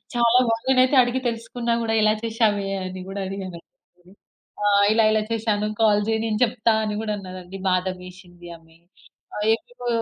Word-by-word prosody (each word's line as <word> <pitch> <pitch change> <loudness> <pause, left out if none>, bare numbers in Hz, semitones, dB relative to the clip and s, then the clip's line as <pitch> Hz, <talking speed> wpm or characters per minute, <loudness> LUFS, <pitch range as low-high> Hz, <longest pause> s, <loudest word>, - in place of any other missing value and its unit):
చాలా 235 +1 +4
బాగుంది. 225 +1 -1
నేనైతే 260 +1 +4
అడిగి 245 +2 -2
తెలుసుకున్న 235 0 -3
కూడా 225 -1 0
ఇలా 215 0 +4
చేశావే 220 -3 0 0.2
అని 185 0 -7
కూడా 200 +1 -5
అడిగాను. 190 -3 -6 1.1
"ఆహ్, 200 0 +4
ఇలా, 225 0 +3
ఇలా 215 0 +1
చేశాను 215 -2 0
కాల్ 210 -2 +4
చెయ్ 220 0 0
నేను 215 -1 -1
చెప్తా" 230 -1 0
అని 210 -1 -3
కూడా 215 - -2
అన్నాదండి. 185 -1 -9
బాధం 185 0 -1
ఏసింది 175 -1 -14
ఆమె 165 0 -23 0.6
ఆహ్, 210 - -2
ఏవేవో 245 +2 -7
215 Hz, 160 wpm, -23 LUFS, 190-230 Hz, 1.1 s, చాలా